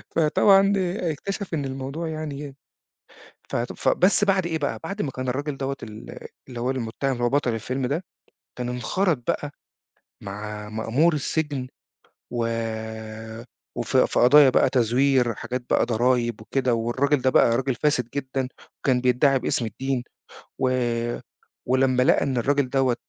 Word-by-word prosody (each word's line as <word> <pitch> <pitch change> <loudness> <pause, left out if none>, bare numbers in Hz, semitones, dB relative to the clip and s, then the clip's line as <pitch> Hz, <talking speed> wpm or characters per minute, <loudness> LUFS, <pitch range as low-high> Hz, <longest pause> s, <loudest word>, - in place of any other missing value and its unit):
فطبعًا 195 +5 +5
ا 180 -2 -1
اكتشف 195 +5 -5
إن 145 -3 -1
الموضوع 135 +5 -4
يعني 145 -3 -5 0.9
ف - - -4
فبس 175 +11 +2
بعد 195 -3 +2
إيه 165 -2 -1
بقى 145 -2 -2
بعد 195 +5 -4
ما 140 - -2
كان 130 0 -5
الراجل 140 +2 -3
دوّة 135 0 -2
ال 110 0 -9 0.2
اللي 125 -2 -7
هو 125 +2 0
المتهم، 130 +1 -2
اللي 120 -2 -3
هو 120 - +3
بطل 135 -3 +1
الفيلم 125 +4 -2
ده، 150 +7 -2 0.5
كان 125 -1 -3
انخرط 155 +8 0
بقى 145 - -4 0.7
مع 105 +1 -6
مأمور 115 +10 +1
السجن، 145 -3 -2 0.6
و 120 -1 0 1.3
وفي - - +2
في - - -2
قضايا 135 +3 +7
بقى 130 - +3
تزوير 125 0 +2
حاجات 125 +3 -4
بقى - - +4
ضرايب 120 -1 +1
وكده، 125 +2 0
والراجل 130 +5 +1
ده 130 - +3
بقى 115 -2 +4
راجل 130 +1 0
فاسد 125 -2 0
جدًا 135 -2 -2 0.3
وكان 130 -2 +2
بيدّعي 130 +2 +3
باسم 125 - -1
الدين، 130 +2 -2 0.6
و 130 - +3 1.0
ولمّا 130 0 +3
لقى - - +4
إن 130 -2 -1
الراجل 140 +2 +1
دوّة، 130 -2 +2
130 Hz, 150 wpm, -24 LUFS, 120-145 Hz, 1.3 s, قضايا